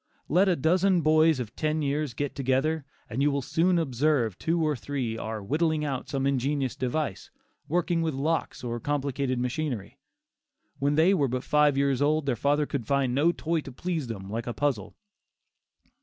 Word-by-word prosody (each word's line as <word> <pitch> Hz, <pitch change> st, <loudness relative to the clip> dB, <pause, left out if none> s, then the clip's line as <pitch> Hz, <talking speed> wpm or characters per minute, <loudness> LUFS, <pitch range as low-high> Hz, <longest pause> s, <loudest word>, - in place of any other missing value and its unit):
Let 185 Hz, +6 st, +4 dB
a 180 Hz, -, +3 dB
dozen 180 Hz, +4 st, +3 dB
boys 155 Hz, -1 st, +4 dB
of 120 Hz, -1 st, -6 dB
ten 155 Hz, 0 st, 0 dB
years 145 Hz, -1 st, -1 dB
get 145 Hz, -1 st, -2 dB
together 135 Hz, +3 st, 0 dB, 0.2 s
and 125 Hz, +5 st, -3 dB
you 145 Hz, -, +4 dB
will 140 Hz, -1 st, -1 dB
soon 170 Hz, +6 st, +2 dB
observe 135 Hz, -, +1 dB
two 165 Hz, +1 st, 0 dB
or 155 Hz, -2 st, +1 dB
three 130 Hz, -4 st, -3 dB
are 110 Hz, -2 st, -5 dB
"whittling" 155 Hz, +6 st, 0 dB
out 135 Hz, -3 st, -3 dB
some 135 Hz, -1 st, -1 dB
ingenious 135 Hz, 0 st, 0 dB
device; 130 Hz, -5 st, -2 dB, 0.4 s
working 170 Hz, +1 st, +1 dB
with 160 Hz, -4 st, -1 dB
locks 155 Hz, +2 st, -1 dB
or 120 Hz, -1 st, -3 dB
complicated 140 Hz, -2 st, -1 dB
machinery. 125 Hz, -3 st, -3 dB, 0.8 s
When 145 Hz, +1 st, +1 dB
they 165 Hz, +5 st, +5 dB
were 145 Hz, -8 st, +2 dB
but 125 Hz, +1 st, -3 dB
five 150 Hz, -2 st, +3 dB
years 140 Hz, -1 st, +1 dB
old, 150 Hz, +1 st, +2 dB
their 135 Hz, -3 st, +1 dB
father 145 Hz, +5 st, +1 dB
could 130 Hz, -6 st, -4 dB
find 140 Hz, -3 st, +1 dB
no 150 Hz, +6 st, +3 dB
toy 165 Hz, -1 st, -1 dB
to 135 Hz, -, -9 dB
please 160 Hz, +1 st, -3 dB
them 100 Hz, -4 st, -6 dB
like 115 Hz, +4 st, -4 dB
a 120 Hz, -, -2 dB
puzzle. 130 Hz, -9 st, -1 dB
145 Hz, 180 wpm, -27 LUFS, 130-155 Hz, 0.8 s, they